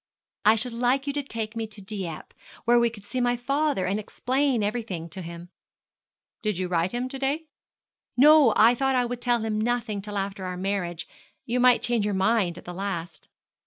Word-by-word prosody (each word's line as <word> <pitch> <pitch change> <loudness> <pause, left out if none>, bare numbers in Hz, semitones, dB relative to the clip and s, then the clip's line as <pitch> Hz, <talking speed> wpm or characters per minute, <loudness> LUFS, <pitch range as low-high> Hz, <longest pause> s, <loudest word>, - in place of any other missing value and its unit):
'I 215 +1 +7
should 235 +2 -1
like 250 +3 +1
you 280 - -2
to 290 - -1
take 225 -5 -5
me 225 -1 -3
to 215 -1 -9
Dieppe, 190 -5 -6 0.3
where 240 +1 +5
we 235 0 +3
could 210 -3 -13
see 255 +4 -2
my 245 0 +2
father, 275 -3 0
and 195 +3 0
explain 255 +2 0
everything 205 -6 -3
to 185 +4 -6
him.' 170 0 -9 0.9
'Did 210 -4 -1
you 185 0 -1
write 175 0 +1
to 240 - -4
him 250 +1 -2
to 270 - -7
day?' 285 +4 -1 0.7
'No; 295 -2 +7
I 230 +2 +7
thought 270 +2 +1
I 250 -1 +2
would 245 0 -5
tell 240 -2 +2
him 215 -1 -1
nothing 230 -3 -1
till 205 0 -5
after 195 -1 -3
our 180 -1 -4
marriage. 180 -3 -3 0.4
You 250 0 0
might 250 -1 +5
change 240 -3 +1
your 205 -1 0
mind 190 -3 +2
at - - -11
the 175 - -6
last.' 180 -2 -5
225 Hz, 205 wpm, -26 LUFS, 195-245 Hz, 0.9 s, I